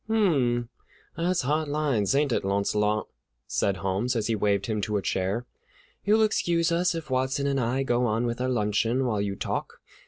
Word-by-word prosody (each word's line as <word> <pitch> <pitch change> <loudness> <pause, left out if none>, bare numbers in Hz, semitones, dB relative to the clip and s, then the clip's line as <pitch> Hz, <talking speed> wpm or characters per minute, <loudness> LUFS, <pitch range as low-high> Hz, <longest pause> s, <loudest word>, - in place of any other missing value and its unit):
"Hum, 135 - +2 0.5
that's 175 0 0
hard 150 +4 0
lines, 145 -7 +1
ain't 145 -1 +2
it, - - 0
Launcelot?" 105 +2 0 0.4
said 95 +10 0
Holmes, 100 +7 -1
as 110 -2 0
he 115 - +1
waved 100 -1 +1
him 110 -1 -1
to 105 +1 -1
a - - -1
chair; 95 +6 -1 0.6
"you'll 215 +2 +4
excuse 170 -6 +1
us 175 +1 +1
if 160 -4 -6
Watson 130 +2 0
and 140 -1 +1
I 125 +3 0
go 120 -1 +1
on 115 +2 0
with 120 +1 -2
our 130 - 0
luncheon 115 +2 +1
while 110 -5 0
you 100 -1 -2
talk. - - -4
120 Hz, 185 wpm, -26 LUFS, 105-150 Hz, 0.6 s, you'll